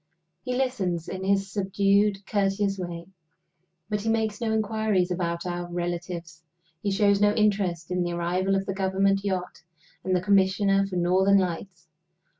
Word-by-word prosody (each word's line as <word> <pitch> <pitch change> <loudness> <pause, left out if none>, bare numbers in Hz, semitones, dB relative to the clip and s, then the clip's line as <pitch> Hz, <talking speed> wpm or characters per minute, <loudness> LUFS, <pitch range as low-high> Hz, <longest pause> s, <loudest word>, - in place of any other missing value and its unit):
He 250 - -2
listens 190 -11 -1
in 190 0 -5
his 195 0 +1
subdued, 200 0 +1
courteous 195 -1 0
way; 170 -2 -5 0.8
but 210 -1 -2
he 225 - -2
makes 220 -1 0
no 225 -1 0
inquiries 215 -4 0
about 170 -1 -2
our 175 -1 -4
relatives; 175 -1 -4 0.4
he 205 - -1
shows 200 0 +3
no 210 0 +4
interest 195 -6 0
in 180 0 0
the 175 0 -1
arrival 180 +3 0
of 195 0 -1
the 195 - -3
Government 195 +1 +1
yacht 185 -3 -3 0.4
and 185 -1 +1
the - - +3
Commissioner 195 0 +3
for 190 - -6
Northern 185 +3 +3
Lights. 180 -1 -3
195 Hz, 155 wpm, -26 LUFS, 180-200 Hz, 0.8 s, no